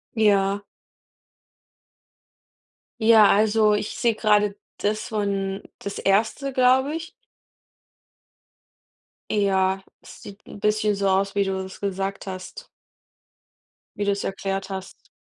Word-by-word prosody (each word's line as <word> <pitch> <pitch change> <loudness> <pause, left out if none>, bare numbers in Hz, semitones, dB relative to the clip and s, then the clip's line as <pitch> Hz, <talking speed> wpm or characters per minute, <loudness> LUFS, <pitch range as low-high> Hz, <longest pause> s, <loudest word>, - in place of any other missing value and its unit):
Ja. 200 -2 +2 2.4
Ja, 220 -2 +7
also 215 +1 +4
ich 210 0 -2
sehe 235 -2 +1
gerade, 210 -2 +2 0.2
das 215 +1 -2
von 200 -2 -2 0.2
das 200 - -6
erste, 220 +7 +1
glaube 260 +4 +3
ich. 330 +2 -6 2.2
Ja, 195 -2 +1 0.2
das - - -14
sieht 200 +1 -12
'n 205 - -10
bisschen 210 0 +1
so 195 0 0
aus, 195 +1 +1
wie 200 - +3
du 190 -1 -2
es 190 - -11
gesagt 195 0 -3
hast. 190 - -8 1.3
Wie 205 - -2
du 200 - +2
es 200 - -2
erklärt 195 0 -3
hast. 190 -1 -8
205 Hz, 115 wpm, -24 LUFS, 195-215 Hz, 2.4 s, Ja